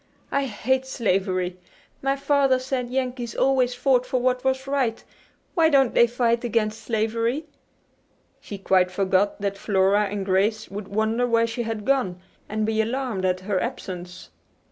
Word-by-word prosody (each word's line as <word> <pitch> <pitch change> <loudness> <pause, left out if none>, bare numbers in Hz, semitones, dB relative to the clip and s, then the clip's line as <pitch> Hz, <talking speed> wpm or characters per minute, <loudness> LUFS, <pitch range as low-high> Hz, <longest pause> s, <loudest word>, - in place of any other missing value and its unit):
"I 280 0 +1
hate 260 +3 -1
slavery. 185 -7 -1 0.4
My 275 0 +1
father 275 -1 +2
said 255 -1 -3
Yankees 250 -2 -3
always 255 -2 +2
fought 250 -1 +2
for 255 0 -1
what 250 0 0
was 265 0 0
right. 270 -5 -1 0.5
Why 325 -2 +4
don't 270 -5 +3
they 235 - +5
fight 235 0 +1
against 220 -2 -1
slavery?" 230 +5 -1 0.9
She 205 - -8
quite 185 -1 +2
forgot 195 +2 +1
that 200 0 -2
Flora 200 +1 +2
and 200 -1 -4
Grace 205 +3 +1
would 200 0 -6
wonder 220 +4 0
where 230 -1 +3
she 230 +1 -3
had 225 -2 -4
gone, 250 -10 +1 0.3
and 215 0 -1
be 220 0 +1
alarmed 230 -4 -2
at 185 0 0
her 190 0 -1
absence. 180 -7 -6
230 Hz, 155 wpm, -24 LUFS, 200-255 Hz, 0.9 s, they